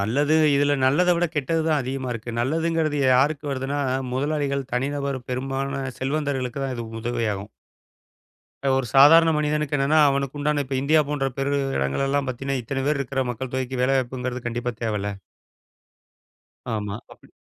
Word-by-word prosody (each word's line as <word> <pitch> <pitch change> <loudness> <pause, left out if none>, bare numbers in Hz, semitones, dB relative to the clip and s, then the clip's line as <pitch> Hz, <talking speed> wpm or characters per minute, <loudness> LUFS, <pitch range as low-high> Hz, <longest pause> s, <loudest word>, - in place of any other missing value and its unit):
நல்லது. 145 +10 +2 0.2
இதில 145 0 +3
நல்லதை 175 +7 +4
விட 175 +1 +2
கெட்டது 160 +3 0
தான் 155 -2 +2
அதிகமா 130 0 -4
இருக்கு. 115 +1 -6
நல்லதுங்கிறது 160 +2 0 0.2
யாருக்கு 145 +3 +2
வருதுன்னா 135 +2 -2 0.3
முதலாளிகள், 140 0 -1
தனிநபர், 140 +2 -1
பெரும்பாலான 135 +2 -2 0.2
செல்வந்தர்களுக்கு 135 -2 -2
தான் 130 -1 -3
இது 120 - -4 0.2
உதவியாகும். 110 -4 -2 1.3
ஒரு 130 - -2
சாதாரண 165 +4 +8
மனிதனுக்கு 150 -1 0
என்னன்னா, 145 +3 +3
அவனுக்கு 140 0 -1
உண்டான 145 0 +1
இப்ப 135 0 -5
இந்தியா 155 +3 +4
போன்ற 145 -2 0
பெரு 140 +1 0 0.2
இடங்கள் 70 - 0
எல்லாம் 140 0 0
பார்த்தீங்கன்னா, 135 +1 -2
இத்தனை 135 +4 -3
பேர் 150 -1 +1
இருக்கிற 135 0 -1
மக்கள் 125 +2 -5
தொகைக்கு 130 -1 -2
வேலை 135 +2 +3
வாய்ப்புங்கிறது 125 0 -3
கண்டிப்பா 120 +1 -2
தேவைல்ல. 105 -3 -1 1.6
ஆமா. 105 -1 -3 0.2
அப்படி. - - -19
135 Hz, 145 wpm, -24 LUFS, 125-145 Hz, 1.6 s, சாதாரண